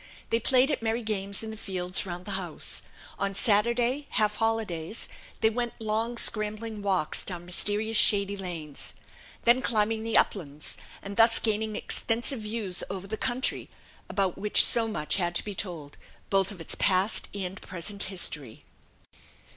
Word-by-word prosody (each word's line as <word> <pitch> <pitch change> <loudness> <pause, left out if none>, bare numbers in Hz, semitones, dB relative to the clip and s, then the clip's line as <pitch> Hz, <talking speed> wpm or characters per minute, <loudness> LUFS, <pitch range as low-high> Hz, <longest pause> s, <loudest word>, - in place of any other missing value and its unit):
They 230 - +3
played 260 +4 +3
at 290 - -2
merry 225 +1 -1
games 200 -1 -1
in 220 - -6
the - - -7
fields 185 -2 -2
round 175 0 -6
the 205 - -5
house: 185 -5 -4 0.4
on 195 0 -2
Saturday 235 +6 +2
half 210 -2 0
holidays 220 -5 -2 0.3
they 220 - +4
went 240 +1 -3
long 225 +2 -2
scrambling 215 -1 +2
walks 190 -6 0
down 175 -2 -4
mysterious 210 +5 +1
shady 200 -1 +5
lanes, 170 -7 -7 0.5
then 240 +2 +4
climbing 220 -2 0
the 225 0 +3
uplands, 150 -6 -1 0.3
and 200 0 -7
thus 230 0 +6
gaining 220 -1 0
extensive 235 +4 -1
views 210 -4 -4
over 195 -1 -5
the 210 +2 -4
country, 255 +3 -2 0.4
about 195 -3 -1
which 210 0 +6
so 230 -1 +4
much 155 -7 -1
had 175 -2 -1
to - - -1
be 205 - -5
told, 170 -8 -6 0.3
both 195 0 +2
of 195 - -10
its 165 - -4
past 190 +2 +2
and 190 -1 -5
present 190 +3 -2
history. 150 - -1
210 Hz, 155 wpm, -27 LUFS, 185-225 Hz, 0.5 s, thus